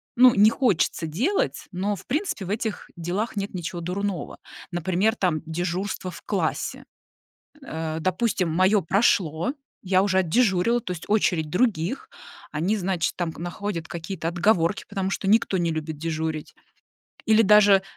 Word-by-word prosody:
ну, 250 Hz, 0 st, +7 dB
не 210 Hz, +2 st, +6 dB
хочется 215 Hz, -9 st, +1 dB
делать, 255 Hz, -, -1 dB
но, 200 Hz, +3 st, -1 dB
в 190 Hz, -, -13 dB
принципе, 295 Hz, -, -2 dB
в -, -, -7 dB
этих 215 Hz, +1 st, -3 dB
делах 180 Hz, +7 st, -3 dB
нет 200 Hz, 0 st, -3 dB
ничего 175 Hz, -1 st, -4 dB
дурного. 185 Hz, +1 st, -3 dB, 0.3 s
Например, 185 Hz, +6 st, +1 dB
там, 175 Hz, -5 st, 0 dB
дежурство 180 Hz, +3 st, -3 dB
в 170 Hz, -, -11 dB
классе. 185 Hz, -6 st, -2 dB, 0.8 s
Э, 160 Hz, 0 st, -3 dB
допустим, 185 Hz, 0 st, 0 dB
моё 190 Hz, +4 st, +4 dB
прошло, 185 Hz, -, +2 dB, 0.3 s
я 185 Hz, -1 st, +3 dB
уже 190 Hz, -2 st, +2 dB
отдежурила, 205 Hz, +4 st, +2 dB
то 180 Hz, -, -5 dB
есть 170 Hz, -, -7 dB
очередь 180 Hz, -7 st, +1 dB
других, 190 Hz, -, 0 dB, 0.4 s
они, 175 Hz, +8 st, 0 dB
значит, 185 Hz, -4 st, -1 dB
там, 175 Hz, -2 st, -1 dB
находят 175 Hz, 0 st, -4 dB
какие-то 170 Hz, 0 st, -4 dB
отговорки, 175 Hz, +1 st, +2 dB
потому 195 Hz, -2 st, -2 dB
что 195 Hz, -, -2 dB
никто 220 Hz, -2 st, +3 dB
не 170 Hz, -1 st, +1 dB
любит 155 Hz, -1 st, -4 dB
дежурить. 160 Hz, -1 st, -3 dB, 0.7 s
Или 220 Hz, 0 st, +5 dB
даже, 205 Hz, -2 st, +6 dB
185 Hz, 145 wpm, -25 LUFS, 165-210 Hz, 0.8 s, ну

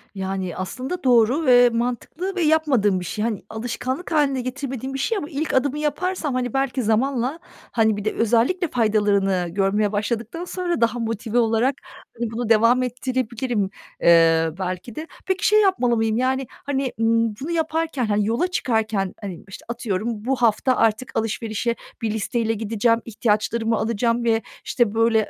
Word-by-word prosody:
Yani, 190 Hz, -2 st, -3 dB
aslında 255 Hz, -, -4 dB
doğru 250 Hz, +5 st, +4 dB
ve 245 Hz, -1 st, +7 dB
mantıklı 250 Hz, +11 st, -3 dB
ve 360 Hz, -, -1 dB
yapmadığım 280 Hz, -, +3 dB
bir 180 Hz, -, -6 dB
şey. 210 Hz, +4 st, -3 dB
Hani, 225 Hz, -4 st, -2 dB
alışkanlık 245 Hz, +8 st, -4 dB
hâline 280 Hz, -4 st, +2 dB
getirmediğim 265 Hz, 0 st, -5 dB
bir 270 Hz, -, -3 dB
şey 430 Hz, +10 st, 0 dB
ama 295 Hz, -, -4 dB
ilk 310 Hz, +1 st, -3 dB
adımı 280 Hz, +2 st, +1 dB
yaparsam, 305 Hz, 0 st, -1 dB
hani, 250 Hz, -2 st, -2 dB
belki 270 Hz, -2 st, 0 dB
zamanla, 255 Hz, +6 st, 0 dB, 0.3 s
hani, 220 Hz, -2 st, +2 dB
bir 205 Hz, -, -6 dB
de 215 Hz, -, 0 dB
özellikle 240 Hz, -, +2 dB
faydalarını 205 Hz, -6 st, +1 dB
görmeye 200 Hz, +2 st, +1 dB
başladıktan 235 Hz, +11 st, -3 dB
sonra 355 Hz, -5 st, -2 dB
daha 230 Hz, +1 st, +2 dB
motive 225 Hz, +1 st, -2 dB
olarak 230 Hz, +3 st, +2 dB, 0.5 s
bunu 230 Hz, 0 st, -2 dB
devam 230 Hz, +3 st, +4 dB
ettirebilirim, 245 Hz, -4 st, -2 dB, 0.3 s
eee, 165 Hz, -1 st, +5 dB
belki 185 Hz, +5 st, -4 dB
de. 315 Hz, +1 st, -6 dB, 0.2 s
Peki, 380 Hz, 0 st, 0 dB
şey 425 Hz, 0 st, +5 dB
yapmalı 315 Hz, -, +2 dB
mıyım: 225 Hz, 0 st, +1 dB
Yani, 260 Hz, 0 st, 0 dB
hani, 270 Hz, -2 st, -3 dB
ımm 230 Hz, -1 st, +2 dB
bunu 315 Hz, -, -4 dB
yaparken, 320 Hz, -5 st, -1 dB
hani, 210 Hz, -1 st, +1 dB
yola 235 Hz, +11 st, +1 dB
çıkarken, 220 Hz, -, -1 dB
hani, 190 Hz, -4 st, -6 dB
işte, 195 Hz, -, -11 dB
atıyorum 230 Hz, -3 st, -3 dB, 0.2 s
bu 270 Hz, +1 st, +1 dB
hafta 245 Hz, +2 st, +2 dB
artık 225 Hz, +3 st, +1 dB
alışverişe 225 Hz, +1 st, -1 dB, 0.3 s
bir 225 Hz, -2 st, -1 dB
listeyle 225 Hz, +1 st, -1 dB
gideceğim, 225 Hz, +2 st, +1 dB
ihtiyaçlarımı 225 Hz, +1 st, 0 dB
alacağım 230 Hz, +2 st, 0 dB
ve, 225 Hz, -1 st, +2 dB, 0.2 s
işte, 235 Hz, -4 st, +1 dB
böyle, 225 Hz, -1 st, +2 dB
235 Hz, 155 wpm, -22 LUFS, 215-265 Hz, 0.5 s, ve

